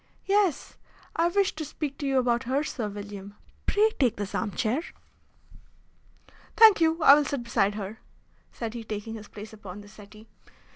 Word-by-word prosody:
"Yes, 395 -7 +1 0.4
I 335 +1 +3
wish 390 +2 +1
to 310 - -5
speak 290 -1 -5
to 285 - -2
you 270 -1 +1
about 245 0 +1
her, 270 +4 0
Sir 230 -8 -4
William. 205 0 -8 0.3
Pray 430 +2 +3
take 245 -5 +3
this 205 -1 -5
arm 220 - -1
chair." 220 - -1 1.8
"Thank 440 -6 +8
you, 325 0 +2
I 280 - +10
will 295 +1 +5
sit 275 -3 -3
beside 205 -3 +1
her," 210 +1 -6 0.5
said 230 -2 -5
he, 235 -1 -6
taking 215 0 -5
his 215 -2 -9
place 215 +1 -10
upon 205 -2 -9
the 205 - -14
settee. 210 +1 -14
235 Hz, 175 wpm, -27 LUFS, 210-300 Hz, 1.8 s, I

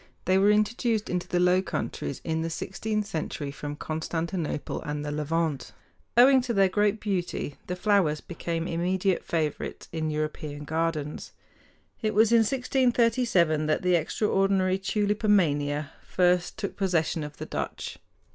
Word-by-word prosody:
They 185 +1 +4
were 200 +2 +5
introduced 215 +1 +1
into 180 -1 -2
the 180 - 0
Low 180 +1 +4
Countries 140 -7 -4
in 160 -1 -1
the 165 - -2
sixteenth 210 +5 -3
century 155 -6 -4
from 145 0 -6
Constantinople 160 +1 -3
and 150 0 -4
the 145 - -3
Levant. 150 -4 -1 0.4
Owing 260 +2 +7
to 245 -2 -2
their 195 -1 +4
great 205 +2 +1
beauty 180 -8 -3
the 180 - -2
flowers 180 -6 +2
became 165 -1 -4
immediate 185 +2 0
favorites 155 -3 -3
in 160 -1 -2
European 150 -1 -3
gardens. 155 -1 -2 0.7
It 215 -1 -1
was 220 +1 +5
in 235 - +6
1637 235 - +2
that 155 - +1
the 180 0 +3
extraordinary 190 +2 +2
tulipomania 190 -9 +1
first 180 -1 +1
took 200 -3 -4
possession 170 -4 0
of 150 0 -8
the - - -5
Dutch. - - -5
180 Hz, 140 wpm, -27 LUFS, 155-205 Hz, 0.7 s, Owing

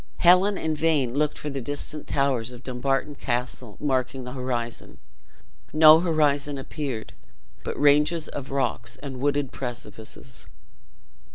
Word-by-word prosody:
Helen 185 +3 +5
in 160 -1 -1
vain 150 -6 +1
looked 150 +2 0
for 150 - -5
the 135 -1 -4
distant 145 +3 -5
towers 130 -4 0
of 125 0 -12
Dumbarton 135 +3 -1
Castle 125 -4 -4
marking 130 -2 -1
the 125 - -7
horizon; 125 -3 -4 0.8
no 155 +1 +8
horizon 150 -4 +1
appeared, 135 -4 -5 0.5
but - - -4
ranges 150 +3 +3
of 140 -2 -7
rocks 130 -4 -1
and 135 -1 -8
wooded 140 0 0
precipices. 120 - -8
140 Hz, 125 wpm, -25 LUFS, 125-150 Hz, 0.8 s, no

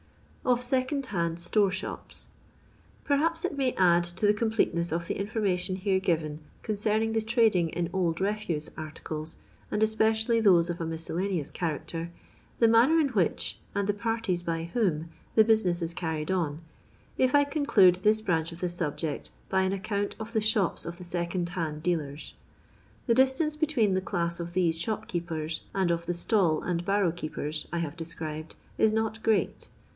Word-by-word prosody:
Ov 245 -1 +3
SkOOND 260 +2 0
HARD 170 -6 -1
StOBB 200 +3 +2
ShOPS. 190 +1 -6 0.7
Perhaps 330 +4 +1
it 365 - -2
may 265 -3 +1
add 175 -2 +4
to 175 +4 -2
the 205 - +5
completeneu 210 -6 0
of 170 +1 -1
the - - -2
information 195 -3 0
here 190 0 +1
given 160 -5 -1 0.2
concerning 215 +1 0
the 225 - +2
trading 220 -7 +3
in 175 +1 -2
old 170 -3 0
refuse 195 -6 -1
articles, 155 0 -6 0.3
and 215 - +1
especially 220 +1 +2
those 175 -5 +5
of 170 - -6
a - - -1
mis 165 0 -5
cellaneous 180 -4 -2
character, 165 0 -3 0.5
the 230 - +5
manner 240 +9 +5
in 295 -3 +2
which, 200 -9 0 0.2
and 200 -1 0
the 205 - +2
parties 225 -4 -1
by 165 -1 -2
whom 170 -9 0 0.3
the 220 - +8
business 195 -6 +2
is 165 0 -3
carried 160 -2 -2
on, 165 -4 -1 0.6
if 255 +1 +4
I 285 - +6
conclude 280 - +4
this 215 +3 +3
branch 165 -5 0
of 170 - -10
the 180 - -1
subject 160 -3 -3 0.2
by 190 0 +2
an 190 0 +1
account 200 +1 -2
of 225 +1 -7
the 220 - +2
shops 210 -4 +1
of 170 0 -6
the 180 - -9
second 175 0 -2
hand 160 -4 -3
dealers. 155 -4 -2 0.7
The 235 - +3
distance 265 +5 +3
between 290 - +2
the 185 - +1
class 170 -1 -2
of 170 0 -5
these 165 -3 +1
shop 220 +1 -2
keepers 160 -2 -3
and 190 -3 +2
of 170 0 -2
the 175 - 0
stall 175 -3 +2
and 175 -1 -1
barrow 195 -2 +2
keepers 155 -2 -3
I 170 - -2
have 165 -2 -3
described 160 -2 -6 0.2
is 220 - +5
not 220 0 -1
great. 220 -1 0
185 Hz, 175 wpm, -28 LUFS, 170-220 Hz, 0.7 s, the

